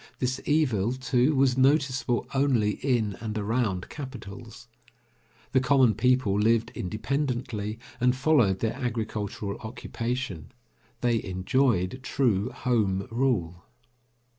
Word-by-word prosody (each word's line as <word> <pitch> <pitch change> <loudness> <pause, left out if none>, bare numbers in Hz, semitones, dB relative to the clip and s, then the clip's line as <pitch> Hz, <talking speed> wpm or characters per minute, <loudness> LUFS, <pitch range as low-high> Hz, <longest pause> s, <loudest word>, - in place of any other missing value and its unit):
This 130 +1 -1
evil, 125 -8 +2
too, 130 +2 +1
was 130 -1 +3
noticeable 135 -3 +2
only 130 -6 +2
in 115 -7 +1
and 110 -1 -4
around 105 -3 -1
capitals. 125 -4 -9 0.8
The 130 - +4
common 130 -3 +4
people 125 -2 +2
lived 115 +2 +2
independently, 115 0 -2 0.2
and 125 +1 +3
followed 130 -9 +3
their 110 - 0
agricultural 110 -5 -3
occupation. 115 - -5 0.5
They 120 -3 +1
enjoyed 95 +2 +1
true 120 -7 +1
Home 100 -6 0
Rule. 110 -9 0
120 Hz, 105 wpm, -27 LUFS, 105-130 Hz, 0.8 s, The